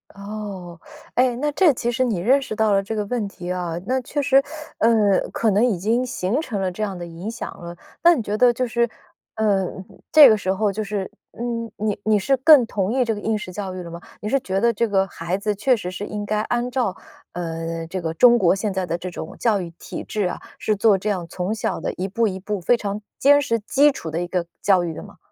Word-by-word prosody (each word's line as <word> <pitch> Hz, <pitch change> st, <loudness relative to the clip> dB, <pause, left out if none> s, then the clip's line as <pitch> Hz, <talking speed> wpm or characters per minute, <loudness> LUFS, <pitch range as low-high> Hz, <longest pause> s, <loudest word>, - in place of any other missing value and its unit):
哦， 200 Hz, -4 st, -7 dB, 0.3 s
哎， 250 Hz, -1 st, +2 dB
那 295 Hz, +4 st, -1 dB
这 335 Hz, +2 st, +4 dB
其 240 Hz, 0 st, -2 dB
实 255 Hz, +2 st, +1 dB
你 230 Hz, -7 st, 0 dB
认 260 Hz, +10 st, +3 dB
识 220 Hz, -, -5 dB
到 220 Hz, -1 st, +2 dB
了 195 Hz, -1 st, +3 dB
这 210 Hz, +3 st, -5 dB
个 210 Hz, -1 st, -1 dB
问 225 Hz, -1 st, -2 dB
题 180 Hz, -2 st, -7 dB
啊， 175 Hz, -2 st, -3 dB
那 260 Hz, +1 st, 0 dB
确 285 Hz, +4 st, -4 dB
实， 275 Hz, -1 st, +4 dB, 0.4 s
呃， 215 Hz, -4 st, +3 dB
可 225 Hz, -, +1 dB
能 205 Hz, +3 st, +3 dB
已 235 Hz, -6 st, +2 dB
经 225 Hz, +7 st, +1 dB
形 245 Hz, +2 st, -1 dB
成 230 Hz, -10 st, -4 dB
了 190 Hz, -1 st, -1 dB
这 195 Hz, +4 st, -7 dB
样 195 Hz, -3 st, -2 dB
的 175 Hz, -, -6 dB
影 170 Hz, +5 st, -7 dB
响 230 Hz, -, -6 dB
了， 170 Hz, 0 st, -8 dB, 0.3 s
那 345 Hz, 0 st, +7 dB
你 235 Hz, -, -2 dB
觉 205 Hz, +1 st, -2 dB
得 245 Hz, +2 st, +5 dB
就 255 Hz, +2 st, -1 dB
是， 235 Hz, 0 st, 0 dB, 0.5 s
呃， 200 Hz, -4 st, +1 dB, 0.4 s
这 305 Hz, -2 st, +10 dB
个 220 Hz, -, +6 dB
时 190 Hz, -2 st, -1 dB
候 205 Hz, +2 st, +1 dB
就 215 Hz, +2 st, -3 dB
是 200 Hz, -2 st, -3 dB, 0.3 s
嗯， 230 Hz, -2 st, -3 dB
你 210 Hz, -1 st, -2 dB
你 215 Hz, -1 st, +4 dB
是 270 Hz, +8 st, +2 dB
更 275 Hz, -1 st, +7 dB
同 200 Hz, -3 st, -2 dB
意 255 Hz, 0 st, +2 dB
这 225 Hz, -, 0 dB
个 205 Hz, -, -6 dB
应 220 Hz, 0 st, 0 dB
试 185 Hz, -, -7 dB
教 190 Hz, -1 st, -5 dB
育 180 Hz, -, -6 dB
了 170 Hz, -, -9 dB
吗？ 170 Hz, +1 st, -8 dB, 0.2 s
你 210 Hz, -, -4 dB
是 275 Hz, +6 st, +2 dB
觉 195 Hz, -6 st, -2 dB
得 235 Hz, +2 st, +3 dB
这 235 Hz, +2 st, 0 dB
个 195 Hz, -2 st, +2 dB
孩 175 Hz, +1 st, -3 dB
子 210 Hz, +1 st, -1 dB
确 240 Hz, +5 st, +2 dB
实 180 Hz, -4 st, -5 dB
是 190 Hz, -, -6 dB
应 210 Hz, 0 st, -4 dB
该 210 Hz, +1 st, 0 dB
按 240 Hz, +2 st, -2 dB
照， 240 Hz, -7 st, 0 dB, 0.4 s
呃， 165 Hz, -1 st, -4 dB
这 185 Hz, +3 st, -5 dB
个 160 Hz, -1 st, -2 dB
中 240 Hz, +4 st, +6 dB
国 185 Hz, -1 st, +4 dB
现 200 Hz, 0 st, -2 dB
在 185 Hz, -2 st, -2 dB
的 170 Hz, -, -1 dB
这 180 Hz, +1 st, -6 dB
种 160 Hz, -, -7 dB
教 215 Hz, -5 st, +2 dB
育 175 Hz, -, -6 dB
体 -, -, -7 dB
制 210 Hz, -2 st, -2 dB
啊， 180 Hz, -, -3 dB, 0.2 s
是 215 Hz, -, 0 dB
做 205 Hz, 0 st, +4 dB
这 205 Hz, +3 st, -3 dB
样 180 Hz, -4 st, -3 dB
从 185 Hz, +3 st, -2 dB
小 220 Hz, -, -2 dB
的 -, -, -3 dB
一 185 Hz, -, -3 dB
步 225 Hz, +4 st, +1 dB
一 190 Hz, -2 st, -4 dB
步 205 Hz, +1 st, -3 dB
非 180 Hz, +8 st, +3 dB
常 205 Hz, -2 st, -4 dB, 0.2 s
坚 285 Hz, +1 st, +6 dB
实 230 Hz, -5 st, 0 dB
基 275 Hz, +7 st, +3 dB
础 165 Hz, -, -7 dB
的 160 Hz, +2 st, -2 dB
一 -, -, -5 dB
个 175 Hz, -1 st, -2 dB
教 190 Hz, -3 st, +3 dB
育 170 Hz, -, -2 dB
的 -, -, -7 dB
吗？ -, -, -14 dB
210 Hz, 275 characters per minute, -22 LUFS, 185-235 Hz, 0.5 s, 这